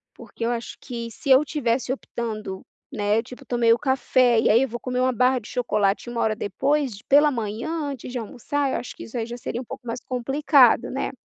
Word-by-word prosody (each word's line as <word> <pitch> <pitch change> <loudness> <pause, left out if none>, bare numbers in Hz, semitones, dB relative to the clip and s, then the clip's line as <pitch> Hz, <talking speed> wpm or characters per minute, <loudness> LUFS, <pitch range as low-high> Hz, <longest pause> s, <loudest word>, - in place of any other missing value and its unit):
Porque 230 - -7
eu 235 - +1
acho 235 -1 -5
que 235 -2 -6
se 280 - -7
eu 265 +2 +7
tivesse 255 -4 -1
optando, 215 -7 -5 0.3
né. 210 -3 +1
Tipo, 250 +2 -12
eu - - -27
tomei 235 -2 +3
o - - +2
café, 255 -3 +3
e - - +2
aí 230 +4 +5
eu - - 0
vou 240 0 -6
comer 250 +2 -3
uma 255 0 +3
barra 255 +2 +3
de 220 - -13
chocolate, 215 -3 0
1 240 -1 -2
hora 215 -1 +1
depois 265 +3 -1
d - - -15
pela 295 +2 +6
manhã, 225 +2 -3 0.2
antes 265 -3 -6
de 250 - -4
almoçar. 270 +5 -2
Eu - - 0
acho 245 - -8
que - - -9
isso 230 - -7
aí 225 - -1
já 240 +1 -7
seria 240 +1 -4
um - - -10
pouco 245 - -9
mais 235 +1 -4
complicado, 265 0 +3
né. 265 - -2
245 Hz, 235 wpm, -24 LUFS, 230-265 Hz, 0.3 s, eu